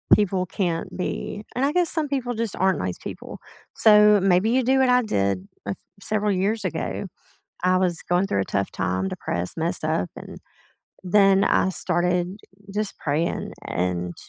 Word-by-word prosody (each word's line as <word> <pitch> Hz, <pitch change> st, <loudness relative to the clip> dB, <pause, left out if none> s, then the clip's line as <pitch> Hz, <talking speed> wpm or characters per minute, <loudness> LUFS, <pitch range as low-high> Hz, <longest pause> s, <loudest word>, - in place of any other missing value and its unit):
people 190 Hz, -3 st, 0 dB
can't 170 Hz, -2 st, -2 dB
be 205 Hz, +3 st, -4 dB
and 255 Hz, -, +1 dB
I 290 Hz, -, 0 dB
guess 355 Hz, -2 st, +2 dB
some 315 Hz, -3 st, 0 dB
people 255 Hz, -3 st, -2 dB
just 225 Hz, -2 st, -2 dB
aren't 190 Hz, 0 st, +2 dB
nice 90 Hz, -1 st, -3 dB
people. -, -, -8 dB, 0.4 s
So, 210 Hz, -1 st, +6 dB
maybe 190 Hz, +3 st, +3 dB
you 260 Hz, +1 st, +3 dB
do 265 Hz, +2 st, +3 dB
what 260 Hz, -1 st, +4 dB
I 250 Hz, 0 st, +5 dB
did 100 Hz, -, -1 dB, 0.5 s
several 210 Hz, 0 st, 0 dB
years 200 Hz, +3 st, 0 dB
ago, 175 Hz, +3 st, -3 dB, 0.6 s
I 185 Hz, 0 st, +4 dB
was 180 Hz, -2 st, 0 dB
going 180 Hz, +2 st, +1 dB
through 100 Hz, -, 0 dB
a -, -, -2 dB
tough 100 Hz, -1 st, -2 dB
time, 95 Hz, 0 st, -1 dB
depressed, 90 Hz, -, -4 dB
messed 165 Hz, 0 st, -2 dB
up, 155 Hz, -, 0 dB
and -, -, -9 dB, 0.7 s
then 195 Hz, +1 st, +4 dB
I -, -, +3 dB
started 180 Hz, +1 st, -1 dB, 0.4 s
just 210 Hz, -1 st, -2 dB
praying 155 Hz, +3 st, -1 dB
and 90 Hz, 0 st, -2 dB
185 Hz, 165 wpm, -24 LUFS, 160-215 Hz, 0.7 s, So